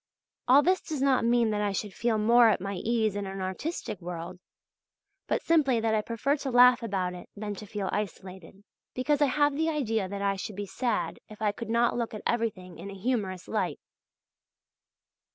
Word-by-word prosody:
All 275 Hz, +3 st, +7 dB
this 370 Hz, +3 st, +2 dB
does 310 Hz, -4 st, -5 dB
not 265 Hz, -4 st, +3 dB
mean 235 Hz, -1 st, +3 dB
that 210 Hz, 0 st, -1 dB
I 205 Hz, -1 st, 0 dB
should 200 Hz, 0 st, -4 dB
feel 230 Hz, -1 st, 0 dB
more 230 Hz, +2 st, +6 dB
at -, -, +2 dB
my 195 Hz, +2 st, -4 dB
ease 220 Hz, +1 st, 0 dB
in 205 Hz, -1 st, -3 dB
an 195 Hz, 0 st, -6 dB
artistic 190 Hz, -, -4 dB
world, 175 Hz, +1 st, -6 dB, 0.9 s
but -, -, 0 dB
simply 285 Hz, -7 st, +3 dB
that 225 Hz, 0 st, 0 dB
I 215 Hz, -, +2 dB
prefer 230 Hz, +6 st, 0 dB
to 275 Hz, -1 st, -4 dB
laugh 250 Hz, 0 st, +6 dB
about 190 Hz, -5 st, -2 dB
it 180 Hz, -, -10 dB
than 205 Hz, 0 st, -4 dB
to 205 Hz, +1 st, -9 dB
feel 200 Hz, -1 st, -4 dB
isolated; 190 Hz, -2 st, -6 dB, 0.3 s
because 290 Hz, +3 st, +1 dB
I 290 Hz, -, +5 dB
have 290 Hz, +2 st, +2 dB
the 320 Hz, +2 st, +1 dB
idea 225 Hz, -10 st, -1 dB
that 200 Hz, 0 st, -4 dB
I 195 Hz, 0 st, +1 dB
should 200 Hz, +2 st, -6 dB
be 205 Hz, +1 st, -4 dB
sad 195 Hz, -6 st, -2 dB
if 215 Hz, -, -12 dB
I 210 Hz, -1 st, +1 dB
could 225 Hz, +2 st, -8 dB
not 235 Hz, +1 st, +2 dB
look 230 Hz, -2 st, -3 dB
at 215 Hz, -, -8 dB
everything 210 Hz, -6 st, -2 dB
in 200 Hz, -, -7 dB
a 200 Hz, -, -8 dB
humorous 195 Hz, -5 st, -2 dB
light. -, -, -2 dB
215 Hz, 200 wpm, -28 LUFS, 195-245 Hz, 0.9 s, All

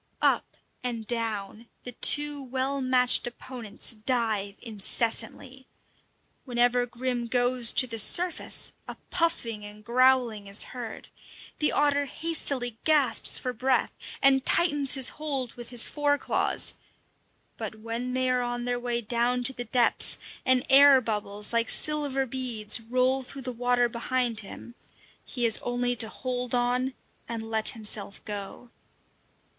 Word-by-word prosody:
Up -, -, 0 dB, 0.3 s
and 235 Hz, -3 st, -4 dB
down, 225 Hz, -1 st, -3 dB, 0.2 s
the 250 Hz, -, -7 dB
two 290 Hz, +3 st, +3 dB
well 265 Hz, +1 st, -3 dB
matched 255 Hz, -1 st, +4 dB
opponents 240 Hz, -3 st, -7 dB
dive 220 Hz, -3 st, -2 dB
incessantly. 230 Hz, +4 st, -3 dB, 0.8 s
Whenever 245 Hz, -1 st, +1 dB
Grim 240 Hz, 0 st, -4 dB
goes 245 Hz, 0 st, +4 dB
to 255 Hz, -, +6 dB
the 230 Hz, -2 st, -2 dB
surface, 345 Hz, -, +2 dB
a -, -, -8 dB
puffing 235 Hz, -, -1 dB
and 210 Hz, +1 st, -12 dB
growling 245 Hz, -4 st, +2 dB
is 200 Hz, +1 st, +4 dB
heard. 240 Hz, -3 st, -8 dB, 0.5 s
The 300 Hz, -, +2 dB
otter 285 Hz, -1 st, +1 dB
hastily 275 Hz, -7 st, -3 dB
gasps 280 Hz, -8 st, +3 dB
for 250 Hz, -, -4 dB
breath, 255 Hz, +2 st, 0 dB, 0.3 s
and 270 Hz, -1 st, +5 dB
tightens 290 Hz, -6 st, +2 dB
his 265 Hz, -2 st, +4 dB
hold 275 Hz, -5 st, -4 dB
with 240 Hz, -1 st, -11 dB
his 240 Hz, -2 st, +3 dB
fore 290 Hz, -1 st, 0 dB
claws; -, -, -1 dB, 0.8 s
but 220 Hz, -, -6 dB
when 230 Hz, +3 st, -5 dB
they 255 Hz, 0 st, 0 dB
are 250 Hz, 0 st, 0 dB
on 240 Hz, 0 st, -4 dB
their 245 Hz, 0 st, -2 dB
way 240 Hz, -1 st, -3 dB
down 240 Hz, +2 st, -1 dB
to 265 Hz, +2 st, +1 dB
the 245 Hz, -1 st, -7 dB
depths, 240 Hz, +1 st, +1 dB, 0.3 s
and 255 Hz, 0 st, +2 dB
air 275 Hz, 0 st, +7 dB
bubbles, 210 Hz, -2 st, +1 dB
like 230 Hz, 0 st, 0 dB
silver 290 Hz, -3 st, -1 dB
beads, 235 Hz, -4 st, +1 dB
roll 255 Hz, +3 st, 0 dB
through 265 Hz, +1 st, -9 dB
the 255 Hz, -, -4 dB
water 245 Hz, 0 st, +1 dB
behind 240 Hz, 0 st, -2 dB
him, 215 Hz, +3 st, -10 dB, 0.5 s
he 245 Hz, -, -5 dB
has 225 Hz, -2 st, +5 dB
only 245 Hz, 0 st, -2 dB
to 225 Hz, -, 0 dB
hold 250 Hz, 0 st, -1 dB
on 250 Hz, +2 st, -1 dB, 0.3 s
and 225 Hz, -1 st, -6 dB
let 220 Hz, -1 st, +3 dB
himself 210 Hz, -2 st, +1 dB
go. 205 Hz, +3 st, -7 dB
245 Hz, 140 wpm, -26 LUFS, 230-260 Hz, 0.8 s, air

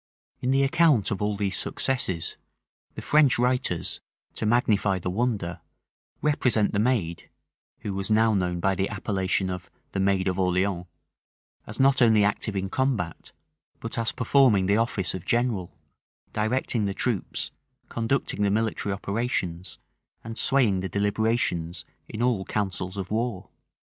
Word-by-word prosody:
In 125 Hz, -, -2 dB
the 135 Hz, +1 st, +3 dB
account 135 Hz, -, +3 dB
of 100 Hz, -, -2 dB
all 105 Hz, 0 st, 0 dB
these 100 Hz, -1 st, -1 dB
successes, 95 Hz, -11 st, 0 dB, 0.6 s
the -, -, -7 dB
French 150 Hz, -3 st, +4 dB
writers, 125 Hz, -8 st, 0 dB, 0.3 s
to 110 Hz, -, -2 dB
magnify 105 Hz, -4 st, +2 dB
the 90 Hz, 0 st, -3 dB
wonder, 100 Hz, -6 st, -2 dB, 0.6 s
represent 125 Hz, -8 st, +2 dB
the 100 Hz, -, +1 dB
maid 105 Hz, -8 st, 0 dB, 0.5 s
(who 100 Hz, -, -4 dB
was 95 Hz, +1 st, -3 dB
now 110 Hz, +1 st, +4 dB
known 90 Hz, -3 st, 0 dB
by 95 Hz, +2 st, +2 dB
the 95 Hz, +1 st, -1 dB
appellation 95 Hz, -2 st, -1 dB
of 90 Hz, -1 st, -6 dB, 0.2 s
"the 95 Hz, -, -3 dB
Maid 95 Hz, -1 st, +2 dB
of 95 Hz, 0 st, -1 dB
Orleans") 90 Hz, 0 st, 0 dB, 0.8 s
as 105 Hz, -, -7 dB
not 135 Hz, 0 st, +4 dB
only 110 Hz, -3 st, +5 dB
active 100 Hz, +1 st, 0 dB
in 95 Hz, 0 st, -1 dB
combat, 115 Hz, -7 st, -2 dB, 0.5 s
but 115 Hz, -, -2 dB
as 115 Hz, -, +1 dB
performing 125 Hz, -6 st, +3 dB
the 100 Hz, +2 st, +3 dB
office 110 Hz, -5 st, +1 dB
of 95 Hz, -, -5 dB
general; 115 Hz, -5 st, 0 dB, 0.6 s
directing 110 Hz, 0 st, 0 dB
the 100 Hz, -1 st, -2 dB
troops, 115 Hz, -7 st, -2 dB, 0.4 s
conducting 115 Hz, -2 st, -1 dB
the 100 Hz, -, +3 dB
military 110 Hz, -1 st, -1 dB
operations, 100 Hz, -3 st, -3 dB, 0.5 s
and 115 Hz, 0 st, -7 dB
swaying 120 Hz, -7 st, +2 dB
the 95 Hz, +1 st, -3 dB
deliberations 100 Hz, -5 st, 0 dB, 0.2 s
in 110 Hz, -, -3 dB
all 120 Hz, -6 st, +1 dB
councils 95 Hz, -2 st, -3 dB
of 95 Hz, -1 st, -5 dB
war. 110 Hz, -4 st, -2 dB
105 Hz, 145 wpm, -26 LUFS, 95-120 Hz, 0.8 s, only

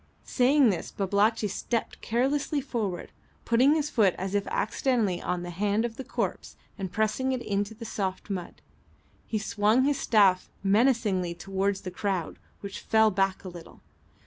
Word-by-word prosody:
Saying 260 Hz, -1 st, +4 dB
this, 180 Hz, -, -4 dB
Babalatchi 205 Hz, +3 st, +1 dB
stepped 230 Hz, +3 st, -3 dB
carelessly 275 Hz, +5 st, 0 dB
forward, 225 Hz, -9 st, -3 dB, 0.3 s
putting 255 Hz, +6 st, +4 dB
his 300 Hz, -1 st, -1 dB
foot 205 Hz, -6 st, +3 dB
as 190 Hz, +1 st, -4 dB
if 205 Hz, -1 st, 0 dB
accidentally 250 Hz, -, 0 dB
on 180 Hz, -1 st, -2 dB
the 175 Hz, -, -6 dB
hand 205 Hz, +5 st, 0 dB
of 230 Hz, -1 st, -5 dB
the 265 Hz, -, -6 dB
corpse -, -, -4 dB, 0.2 s
and 190 Hz, -4 st, -5 dB
pressing 220 Hz, +5 st, 0 dB
it 255 Hz, -, -2 dB
into 205 Hz, +2 st, -2 dB
the 230 Hz, +1 st, -9 dB
soft 190 Hz, -4 st, -3 dB
mud. 185 Hz, -4 st, -6 dB, 0.6 s
He 220 Hz, -, -1 dB
swung 215 Hz, +3 st, +2 dB
his 280 Hz, 0 st, +1 dB
staff 195 Hz, -7 st, +3 dB
menacingly 200 Hz, -5 st, +2 dB
towards 195 Hz, +2 st, -2 dB
the 185 Hz, -, -6 dB
crowd, 185 Hz, -3 st, -3 dB, 0.2 s
which 200 Hz, -1 st, -6 dB
fell 220 Hz, -1 st, +3 dB
back 195 Hz, -1 st, 0 dB
a -, -, -7 dB
little. 175 Hz, -2 st, -12 dB
210 Hz, 160 wpm, -27 LUFS, 195-240 Hz, 0.6 s, Saying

